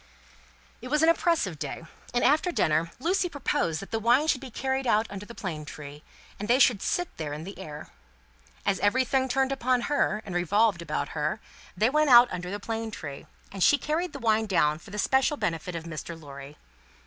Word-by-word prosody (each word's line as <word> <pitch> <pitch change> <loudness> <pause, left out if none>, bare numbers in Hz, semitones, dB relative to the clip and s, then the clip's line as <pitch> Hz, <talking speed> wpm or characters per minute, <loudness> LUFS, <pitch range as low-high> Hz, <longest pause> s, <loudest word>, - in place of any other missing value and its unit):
It - - -7
was 300 +4 +1
an 325 - +6
oppressive 330 - +1
day, 145 +3 -5 0.3
and, 245 - 0
after 310 +6 +3
dinner, 160 - +1
Lucie 360 +6 0
proposed 220 - -1
that 195 - -10
the 225 - 0
wine 240 +6 +3
should 275 -5 +1
be 265 - -8
carried 265 +2 -2
out 215 -1 +3
under 200 +1 -7
the 235 - -10
plane 160 -6 -5
tree, 150 -1 -9 0.4
and 205 - -4
they 245 - +4
should 245 -7 +4
sit 355 -1 -2
there 150 -2 -4
in 150 +2 -6
the 195 +4 -9
air. 150 0 -9 0.7
As 195 - +1
everything 260 +4 +2
turned 265 +1 +1
upon 255 -2 +1
her, 230 -6 0
and 195 - -6
revolved 190 +2 +2
about 155 -2 -3
her, 155 +7 -2 0.4
they 220 +6 +3
went 305 0 +3
out 245 0 +8
under 180 0 -4
the 205 +2 -4
plane 225 +1 -4
tree, 145 -9 -8 0.2
and 195 - -7
she 290 - +6
carried 310 +5 -2
the 290 - -7
wine 220 -3 +1
down 155 -5 +2
for 175 - -15
the 205 - -7
special 265 +6 +2
benefit 170 - -3
of 165 - -4
Mr. 165 0 -7
Lorry. 140 -1 -11
215 Hz, 205 wpm, -27 LUFS, 165-265 Hz, 0.7 s, out